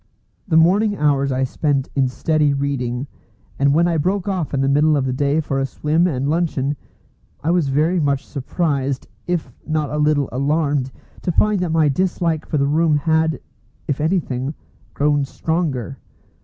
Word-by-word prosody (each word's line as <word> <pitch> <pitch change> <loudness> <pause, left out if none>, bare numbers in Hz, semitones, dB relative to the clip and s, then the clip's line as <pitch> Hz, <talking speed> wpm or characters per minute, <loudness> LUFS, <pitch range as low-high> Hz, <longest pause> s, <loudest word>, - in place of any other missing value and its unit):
The 160 -4 +3
morning 200 +6 +4
hours 140 -2 +2
I 130 0 0
spent 140 +1 0
in 135 -2 +2
steady 150 +2 +1
reading; 135 -3 -2 0.5
and 140 0 +4
when 165 +4 +3
I 170 -1 +1
broke 185 +5 0
off 185 -6 -2
in 135 - 0
the 135 - +1
middle 150 +2 +3
of 135 - 0
the 130 - -1
day 140 +3 +1
for 140 -3 -1
a 135 - +1
swim 155 +6 +1
and 135 -4 -1
luncheon, 150 -3 0 0.7
I 160 - +1
was 175 -4 +2
very 155 +6 +2
much 140 -2 0
surprised, 140 -2 -2 0.2
if 175 -2 -2
not 155 -3 -1
a 150 - -2
little 150 -2 +2
alarmed, 140 0 0 0.3
to 175 - -1
find 210 +3 +2
that 180 -1 -1
my 160 -1 +3
dislike 165 +1 0
for 150 - -1
the 140 - +2
room 155 +2 +2
had, 160 0 +1 0.5
if 145 0 -1
anything, 150 -5 -1 0.4
grown 145 0 +2
stronger. 140 -3 -2
150 Hz, 170 wpm, -20 LUFS, 140-165 Hz, 0.7 s, morning